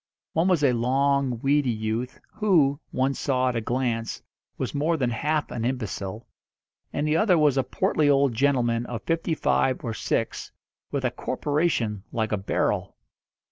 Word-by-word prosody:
One 165 +3 +2
was 180 -6 +2
a 130 -3 +4
long, 135 +1 +1
weedy 140 -1 +2
youth, 110 +2 -2 0.2
who, 160 -10 +3
one 130 +1 0
saw 130 -2 0
at 125 - -3
a 115 - 0
glance, 120 -1 -2 0.3
was - - -3
more 155 +3 +1
than 125 -4 0
half 150 +5 -1
an 115 - -3
imbecile; 110 -4 -3 0.7
and 150 - -1
the 150 - +2
other 190 -4 +4
was 150 -3 +4
a 135 - +3
portly 150 +3 +1
old 140 -2 +3
gentleman 120 -2 +1
of 120 -2 -5
fifty 165 0 0
five 130 -3 +1
or 115 - -2
six, - - -2 0.4
with 140 -2 -2
a 125 - +1
corporation 130 - -1
like 110 -1 -1
a 105 - +1
barrel. 95 - -1
130 Hz, 165 wpm, -25 LUFS, 115-145 Hz, 0.7 s, a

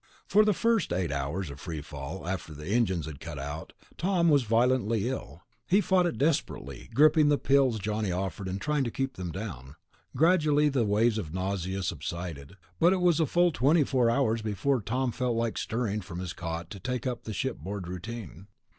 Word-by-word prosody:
For 215 - +5
the 210 - +3
first 230 0 +1
eight 90 -3 0
hours 70 +4 -2
of 70 - -10
free 80 0 -5
fall, 75 +4 -7
after 90 -4 -4
the 75 +1 -9
engines 95 -5 +1
had 75 -3 -8
cut 85 -2 -7
out, 70 +3 -6 0.3
Tom 175 -2 +2
was 145 -3 +5
violently 115 -1 +2
ill. 85 - -5 0.2
He 195 - +4
fought 185 -3 +3
it 170 - -3
desperately, 70 - -1
gulping 150 +4 +5
the 145 - +4
pills 135 -5 +3
Johnny 105 -1 -2
offered 95 +1 -3
and 95 +1 -3
trying 150 +3 0
to - - -1
keep 135 +2 -2
them 90 -5 -5
down. 75 - -7 0.4
Gradually 155 -3 +4
the 130 -5 +1
waves 110 +2 +2
of 85 -4 -6
nausea 95 0 -2
subsided, 85 -1 -5 0.2
but 175 +3 +5
it 190 - 0
was 175 -2 +3
a 160 - +3
full 175 +3 +3
twenty 150 +3 +3
four 130 -4 +2
hours 115 -3 +1
before 110 +5 0
Tom 125 +5 -1
felt 125 0 -1
like 115 -1 -1
stirring 110 -2 -2
from 90 -2 -8
his 90 -1 -4
cot 85 0 -5
to 100 - -7
take 125 +5 -3
up 125 -2 -3
the 110 - -4
shipboard 95 +1 -4
routine. 95 0 -7
110 Hz, 195 wpm, -28 LUFS, 90-135 Hz, 0.4 s, For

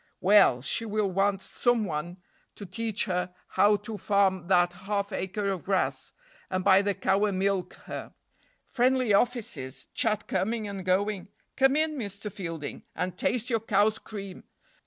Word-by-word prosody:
Well, 180 -11 +5
she 185 - 0
will 210 -3 -1
want 195 +1 +1
some 240 0 +1
one 170 +1 -4 0.4
to 205 - -8
teach 220 +3 -2
her 180 -2 -2
how 210 +1 +4
to 215 -1 -5
farm 190 -3 +2
that 175 -1 +3
half 200 +3 -3
acre 195 +2 -2
of 190 -3 -3
grass, 195 -1 0 0.4
and 185 0 -1
buy 195 0 +6
the 200 -1 -1
cow 195 +2 +2
and 200 -3 -1
milk 195 -1 0
her. - - -7 0.5
Friendly 255 -3 +2
offices 200 - 0
chat 215 -2 0
coming 215 +4 -1
and 195 -2 -5
going 190 +1 0 0.3
come 270 +1 +4
in, 310 -1 +1
Mr. 205 -1 -5
Fielding, 165 -6 -6
and 180 -1 -2
taste 245 +5 0
your 230 - +2
cow's 210 0 +2
cream! 200 -3 -8
200 Hz, 155 wpm, -28 LUFS, 185-215 Hz, 0.5 s, buy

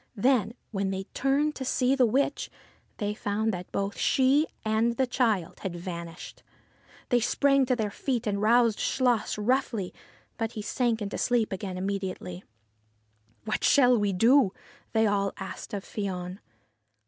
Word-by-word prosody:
Then, 235 -1 +2 0.2
when 195 -2 -1
they 190 0 -3
turned 285 +3 +1
to 265 - -4
see 255 0 +1
to 275 - +2
the 255 - +5
witch, 280 +5 0 0.5
they 205 -2 -1
found 210 +1 -1
that 180 0 -6
both 200 +2 -2
she 275 +3 +3 0.2
and 225 +2 +1
the 265 - +3
child 225 -9 0
had 190 -3 -4
vanished. 170 -1 -7 0.7
They 245 - +4
sprang 275 +3 +3
to 255 - +2
their 215 -3 -2
feet 245 +1 -2
and 200 -1 -1
roused 230 0 +4
Chluas 245 -6 +1
roughly. 225 -3 0 0.5
But 225 0 -2
he 215 - -5
sank 225 -2 0
to - - -5
sleep 240 -3 +1
again 190 -1 -4
immediately. 190 -2 -4 0.5
' 110 0 -40
What - - -2
shall 250 -3 +5
we 205 -3 +1
do? 225 +3 +4 0.2
' - - -29
they 220 -1 +3
all 200 -1 +1
asked 195 -1 -7
of 200 -2 -4
Fion. 185 -2 -4
215 Hz, 160 wpm, -28 LUFS, 195-250 Hz, 0.7 s, the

